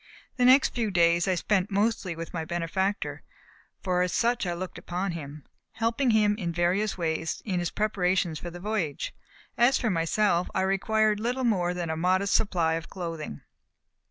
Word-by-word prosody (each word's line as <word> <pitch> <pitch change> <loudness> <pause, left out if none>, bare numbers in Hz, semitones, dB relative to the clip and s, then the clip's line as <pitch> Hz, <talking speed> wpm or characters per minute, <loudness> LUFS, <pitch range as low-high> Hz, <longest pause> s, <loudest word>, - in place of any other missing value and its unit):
The 250 - +3
next 260 +2 +6
few 230 -3 -1
days 170 -1 +3
I 185 - +2
spent 190 +2 0
mostly 205 -3 0
with 165 0 -7
my 165 -2 -2
benefactor, 175 +4 -2 0.6
for 180 -1 +1
as 180 -1 +1
such 235 -1 +1
I 175 - -1
looked 185 +1 -6
upon 180 +2 -3
him, 150 -3 -8 0.3
helping 230 +4 0
him 210 -2 +3
in 175 -6 -2
various 180 +5 0
ways 160 -2 -2
in 185 -5 -1
his 175 -1 -1
preparations 185 -6 0
for 175 - -6
the 175 +1 -9
voyage. 185 -7 -2 0.5
As 245 +3 +5
for 225 - 0
myself, 175 +2 +1
I - - +2
required 210 +2 +2
little 245 +4 -1
more 180 -7 +1
than 170 -2 -3
a - - -2
modest 185 +4 +1
supply 170 -6 +2
of 165 0 -4
clothing. 165 - -6
185 Hz, 175 wpm, -27 LUFS, 170-215 Hz, 0.6 s, next